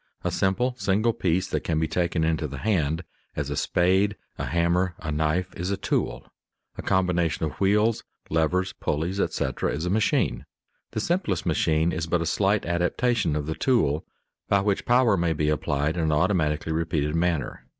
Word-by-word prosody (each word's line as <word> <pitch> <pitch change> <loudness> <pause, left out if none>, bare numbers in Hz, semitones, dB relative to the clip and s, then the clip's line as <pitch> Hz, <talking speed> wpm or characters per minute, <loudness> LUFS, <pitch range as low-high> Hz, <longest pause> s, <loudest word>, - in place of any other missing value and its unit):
A 90 - 0
simple, 100 +8 +1
single 105 +4 +2
piece 90 -2 0
that - - -2
can 80 - -1
be 80 - +1
taken 85 0 0
into 80 -1 0
the 70 -1 -7
hand, 80 -3 0 0.3
as 70 -1 -3
a - - -1
spade, 95 +7 +2 0.2
a - - -2
hammer, 85 +2 +1
a 75 - -5
knife, 80 +5 0
is 90 +2 -3
a 100 - -1
tool; - - -2 0.5
a - - -6
combination 90 -4 +1
of 75 -4 -7
wheels, 105 +3 +2 0.2
levers, 90 +4 +1
pulleys, 85 +6 -2
etc., - - -1
is 80 +3 -3
a 90 - -1
machine. 110 +1 +1 0.5
The - - -1
simplest 105 - -1
machine 80 0 +2
is 80 -1 -3
but 85 +1 +1
a - - -4
slight 100 +4 +1
adaptation 90 +2 +1
of 75 -1 -2
the 80 - -2
tool, 80 - +1 0.5
by 100 -1 +4
which 100 -1 -1
power 120 -4 +4
may 85 -1 +1
be 75 -1 0
applied 75 +1 0
in 80 - +1
an 80 - +1
automatically 80 -2 +1
repeated 80 -2 -1
manner. 85 -5 -1
85 Hz, 180 wpm, -25 LUFS, 80-95 Hz, 0.5 s, by